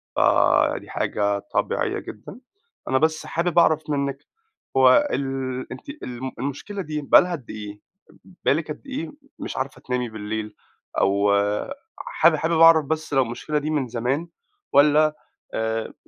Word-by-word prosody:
فدي - - +3
حاجة 100 -1 -1
طبيعية - - -1
جدًا. 110 - -10 0.5
أنا 130 - +3
بس 160 +2 +1
حابب 170 0 +1
أعرف 155 -2 +2
منِّك 140 -1 -2 0.5
هو 130 -1 +6
ال 130 -1 -3
أنتِ - - -9
الم 125 +1 -5
المشكلة 140 - -4
دي 155 -3 -4
بقى 140 - +7
لها 180 0 -3
قد 145 -8 -7
إيه؟ 105 -1 -7 0.7
بقى - - +5
لِك 155 +1 -3
قد 150 - -8
إيه 275 +4 -5 0.3
مش - - -6
عارفة 130 +1 -4
تنامي 125 -1 -2
بالليل؟ 105 0 -5 0.4
أو 100 +1 +2 0.7
حابب 170 0 +2
حابب 160 +2 0
أعرف 165 -2 +7
بس 155 +1 -3
لو 135 - +4
المشكلة 125 +6 -3
دي 150 +1 -4
من 145 -4 0
زمان، 125 +8 -2 0.5
والّا 150 +1 +5 0.4
آآ 110 0 -2
140 Hz, 145 wpm, -23 LUFS, 120-155 Hz, 0.7 s, بقى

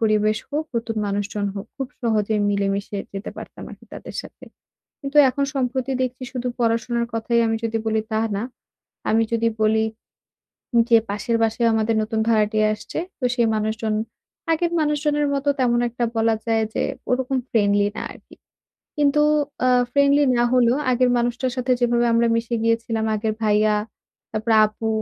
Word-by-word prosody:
পরিবেশ 215 -1 +2
হোক, 300 +2 -1
নতুন 230 -1 -3
মানুষজন 205 +1 -2
হোক, 200 - -6
খুব 270 -2 -4
সহজেই 215 -2 +1
মিলেমিশে 200 0 -1 0.2
যেতে 195 +1 -5
পারতাম - - -9
আরকি - - -13
তাদের - - -9
সাথে। - - -13 0.6
কিন্তু 275 0 -5
এখন 280 +2 0
সম্প্রতি 260 0 -1
দেখছি 255 0 -3
শুধু 250 -1 -3
পড়াশোনার 235 0 0
কথাই 235 +1 +1
আমি 225 0 0
যদি 225 0 -1
বলি, 220 0 +1
তা 220 - +1 0.2
না! 205 - -2 0.7
আমি 225 +1 +3
যদি 230 0 +2
বলি 220 +1 +3 0.9
উম 235 - +5
যে 230 - +7
পাশের 210 +3 -1
বাসায়ও 230 +1 +2
আমাদের 220 +1 +1
নতুন 220 +1 -2
ভাড়াটিয়া 215 -1 +3
আসছে। 210 +8 -6 0.2
তো 255 - -1
সেই 235 -2 +2
মানুষজন 220 0 -1 0.6
আগের 335 +1 +1
মানুষজনের 295 -1 +1
মতো 280 +1 0
তেমন 240 -2 +2
একটা 240 +1 -4
বলা 225 0 +2
যায় 225 -1 +2
যে - - 0 0.3
ওরকম 260 +1 0
ফ্রেন্ডলি 205 -2 +2
না - - -4
আরকি। - - -17 0.6
কিন্তু 295 0 +3 0.4
আ - - +4 0.2
ফ্রেন্ডলি 280 +1 +4
না 240 - +4
হলেও 245 -1 +4
আগের 250 0 +3
মানুষটার 245 +2 -1
সাথে 255 0 0
যেভাবে 240 0 +2
আমরা 230 +1 +3
মিশে 230 +1 -2
গিয়েছিলাম, 230 -1 0
আগের 215 0 -1
ভাইয়া 210 0 +3 0.6
তারপরে 220 +1 0
আপু 215 +1 -5
230 Hz, 160 wpm, -22 LUFS, 215-250 Hz, 0.9 s, যে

